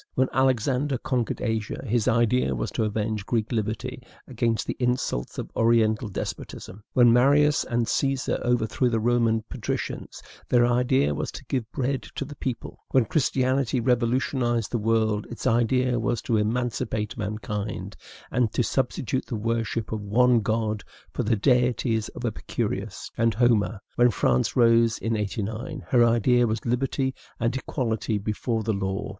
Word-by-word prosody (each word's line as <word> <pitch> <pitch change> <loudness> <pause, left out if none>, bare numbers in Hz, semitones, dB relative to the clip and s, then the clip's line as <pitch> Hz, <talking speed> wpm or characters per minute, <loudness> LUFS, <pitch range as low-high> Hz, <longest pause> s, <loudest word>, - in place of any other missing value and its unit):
When 130 0 +2
Alexander 130 +1 +1
conquered 120 -1 -2
Asia, 110 -3 -2
his 115 -2 0
idea 115 - +2
was - - -3
to 110 - 0
avenge 105 0 -2
Greek 110 0 -1
liberty 115 +3 -3 0.3
against 115 -3 0
the - - -3
insults 125 - -1
of - - -5
Oriental 115 0 +3
despotism; 100 +1 -6
when 120 -2 +6
Marius 145 +4 +4
and 120 -2 0
Caesar 135 -1 0
overthrew 120 +1 +1
the 115 -1 0
Roman 115 -1 +2
patricians, - - -5 0.3
their 120 -1 +5
idea 125 - +2
was - - -3
to - - -9
give 120 -4 -3
bread 135 0 -1
to 140 - -3
the 145 +1 -9
people; 130 -3 -5
when 130 -3 +3
Christianity 130 -1 +1
revolutionized 120 -1 +1
the 120 - 0
world, 110 -1 +1
its 120 - -7
idea 120 +1 +2
was 115 +1 0
to 115 - 0
emancipate 110 -1 -1
mankind, 105 0 -4 0.4
and 120 -3 +1
to 125 - +1
substitute 130 +1 -1
the 120 - -3
worship 115 0 -2
of 110 -1 -2
one 120 +4 +4
God 110 -1 -1 0.3
for - - -1
the 115 +1 +2
deities 120 -1 +1
of 125 - -5
Epicurus 105 -2 -3
and 115 -3 +2
Homer; 115 -3 +2 0.2
when 120 0 +6
France 65 - +1
rose 115 -1 +4
in 115 0 -1
'89, 110 - -4
her 120 -2 +5
idea 120 +1 +3
was 110 0 -3
liberty 130 +2 0 0.3
and 115 +1 0
equality 115 -5 -2
before 110 +2 -2
the 110 +1 0
law. 95 -1 -2
115 Hz, 150 wpm, -25 LUFS, 110-125 Hz, 0.4 s, when